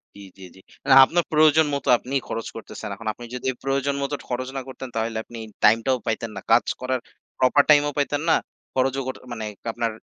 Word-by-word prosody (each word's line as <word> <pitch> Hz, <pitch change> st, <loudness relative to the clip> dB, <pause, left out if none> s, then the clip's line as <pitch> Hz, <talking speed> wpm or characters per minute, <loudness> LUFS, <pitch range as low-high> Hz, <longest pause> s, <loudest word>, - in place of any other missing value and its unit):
জ্বী, 100 Hz, -, -12 dB, 0.2 s
জ্বী, 95 Hz, -, -11 dB
জ্বী। 95 Hz, -, -16 dB, 0.2 s
মানে 135 Hz, -1 st, +5 dB
আপনার 170 Hz, +4 st, +1 dB
প্রয়োজন 155 Hz, 0 st, +5 dB
মত 140 Hz, -, -3 dB
আপনিই 135 Hz, +2 st, -2 dB
খরচ 115 Hz, 0 st, -4 dB
করতেছেন। 110 Hz, -1 st, -8 dB
এখন 110 Hz, +2 st, -10 dB
আপনি 120 Hz, -, -11 dB
যদি 130 Hz, +1 st, -2 dB
প্রয়োজন 140 Hz, +1 st, 0 dB
মত 140 Hz, -, -2 dB
ঠ -, -, -16 dB
খরচ 125 Hz, +1 st, -2 dB
না -, -, -2 dB
করতেন, 130 Hz, -1 st, -8 dB
তাহলে 110 Hz, 0 st, -2 dB
আপনি 115 Hz, -1 st, -10 dB, 0.2 s
time 115 Hz, +2 st, +6 dB
টাও 130 Hz, -1 st, +2 dB
পাইতেন 115 Hz, 0 st, -2 dB
না। -, -, -6 dB
কাজ 115 Hz, -, +5 dB, 0.2 s
করার 130 Hz, 0 st, -1 dB, 0.4 s
proper 130 Hz, +3 st, +5 dB
time 145 Hz, -1 st, +7 dB
ও -, -, -4 dB
পাইতেন 145 Hz, +1 st, 0 dB
না। -, -, +6 dB, 0.4 s
খরচও 135 Hz, +1 st, +1 dB
কর 130 Hz, -, -3 dB, 0.2 s
মানে 110 Hz, -2 st, -5 dB, 0.2 s
আপনার 115 Hz, 0 st, -1 dB
130 Hz, 215 wpm, -23 LUFS, 115-140 Hz, 0.4 s, time